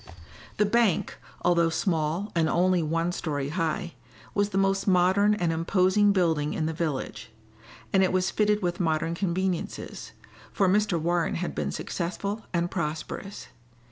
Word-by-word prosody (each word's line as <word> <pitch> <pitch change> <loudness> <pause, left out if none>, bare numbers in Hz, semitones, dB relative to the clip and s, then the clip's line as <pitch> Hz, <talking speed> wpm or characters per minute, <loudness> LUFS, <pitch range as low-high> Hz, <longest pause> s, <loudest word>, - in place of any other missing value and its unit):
The 210 - +3
bank, 220 -3 +1 0.2
although 170 -1 +3
small 165 +3 -1
and 165 -2 +2
only 180 0 +2
one 165 +2 0
story 145 -6 -3
high, 170 +2 -2 0.4
was 205 0 +1
the 195 - -3
most 195 +1 +1
modern 190 +3 +4
and 175 -5 0
imposing 185 +5 +3
building 160 -6 +1
in 155 - -1
the 160 - -1
village; 140 -9 -3 0.6
and 190 - +5
it 185 - +2
was 185 0 +1
fitted 210 -1 +1
with 175 -1 -1
modern 165 -1 0
conveniences, 185 0 -3 0.4
for 195 - +2
Mr. 200 -2 +2
Warren 170 +1 0
had 175 +1 -3
been - - -2
successful 200 +5 -4
and 170 0 -1
prosperous. 170 +4 -5
175 Hz, 145 wpm, -27 LUFS, 165-195 Hz, 0.6 s, and